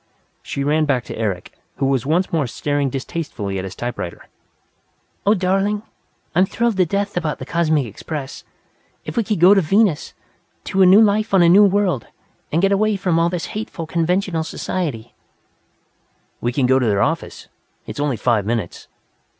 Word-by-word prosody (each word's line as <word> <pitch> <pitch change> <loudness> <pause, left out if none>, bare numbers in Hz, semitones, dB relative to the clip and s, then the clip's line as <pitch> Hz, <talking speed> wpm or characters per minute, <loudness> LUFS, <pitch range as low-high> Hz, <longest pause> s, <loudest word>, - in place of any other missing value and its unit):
She 140 - -4
ran 155 +2 +2
back 130 -5 0
to - - -8
Eric, 100 -5 -3 0.2
who 140 - -1
was 135 -2 0
once 175 +5 +1
more 155 -5 +1
staring 145 +3 -1
distastefully 130 - -4
at - - -4
his 95 -1 -7
typewriter. 120 -8 -5 1.0
"Oh, 210 - +5
darling! 195 +2 0 0.5
I'm 185 +3 +3
thrilled 235 -1 0
to 185 -2 +3
death 200 +3 -2
about 160 -4 -1
the 130 - -7
Cosmic 155 -2 +1
Express! 135 +6 -7 0.6
If - - -6
we 230 - +2
could 210 -3 -2
go 180 +4 +7
to 195 - +4
Venus, 190 -1 +1 0.5
to 195 - 0
a 185 - +7
new 195 +4 +7
life 215 -1 +2
on 185 - +6
a 170 - +5
new 200 +4 +7
world, 195 - +1 0.4
and 165 +4 +1
get 195 - +4
away 215 +2 +2
from 180 -4 0
all 170 +1 +2
this 175 -1 -3
hateful 205 -5 -5
conventional 170 +1 0
society 150 -9 -4 0.6
" - - -43
"We 120 - 0
can 130 +1 +1
go 130 +1 +4
to 125 - 0
their 100 -2 +2
office - - -3 0.4
it's - - -7
only 145 -4 0
five 115 -4 +1
minutes. 110 -4 -3
165 Hz, 180 wpm, -20 LUFS, 130-195 Hz, 1.0 s, go